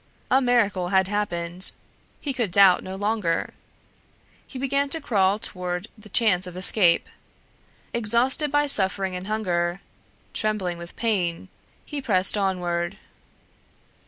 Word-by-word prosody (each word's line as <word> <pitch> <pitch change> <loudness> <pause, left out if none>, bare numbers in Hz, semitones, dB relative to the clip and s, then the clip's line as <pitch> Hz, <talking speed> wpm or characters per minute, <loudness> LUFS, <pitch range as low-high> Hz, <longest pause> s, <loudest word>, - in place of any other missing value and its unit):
A 265 +1 +4
miracle 215 -8 +1
had 190 -1 +2
happened. 185 -3 +1 0.5
He 280 - -3
could 235 -7 -2
doubt 195 -1 +6
no 190 0 -7
longer. 205 -4 -2 0.9
He 265 - -9
began 275 +2 -1
to 325 - 0
crawl 200 -8 +1
toward 180 -1 -5
the 215 -1 -16
chance 185 -4 +2
of 180 0 -9
escape. 185 -2 +5 0.9
Exhausted 235 +6 +1
by 290 0 +2
suffering 190 -7 +2
and 180 +1 -6
hunger, 180 -4 -2 0.5
trembling 195 -5 -2
with 170 0 -10
pain, 190 -6 -2 0.4
he 295 -2 -5
pressed 195 -7 +1
onward. 180 -3 -2
195 Hz, 125 wpm, -23 LUFS, 180-230 Hz, 0.9 s, doubt